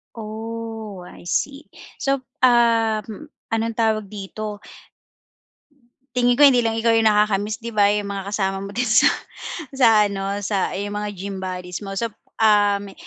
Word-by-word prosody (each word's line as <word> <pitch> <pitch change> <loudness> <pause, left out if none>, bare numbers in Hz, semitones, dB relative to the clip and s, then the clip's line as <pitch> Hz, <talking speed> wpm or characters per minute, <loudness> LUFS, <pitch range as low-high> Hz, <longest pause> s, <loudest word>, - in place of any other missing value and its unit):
Oh, 225 -2 -6
I - - -14
see. 275 - -2 0.3
So, 275 -1 0 0.2
um, 230 +2 +2 0.2
anong 225 0 -1
tawag 215 -3 0
dito? 205 +1 -6 1.6
Tingin 245 0 +3
ko 290 - +6
hindi 255 -3 +7
lang 225 -1 0
ikaw 230 0 +2
yung 225 -1 +4
nakaka-miss 210 0 +2
'di 230 +1 -7
ba, 205 -1 +4
yung 205 -1 -1
mga 195 0 -5
kasama 195 -2 -1
mo 195 - -6
din 250 - +1
sa 220 - +5 0.6
sa 265 -3 +5 0.2
ano, 200 0 -2
sa 195 -2 -1
yung 205 +1 -4
mga 210 0 -3
gym 195 +1 -5
bodies 180 -1 -5
mo. 195 -1 -6
So, 230 0 -2 0.2
um, 205 -2 +3
215 Hz, 150 wpm, -22 LUFS, 200-230 Hz, 1.6 s, hindi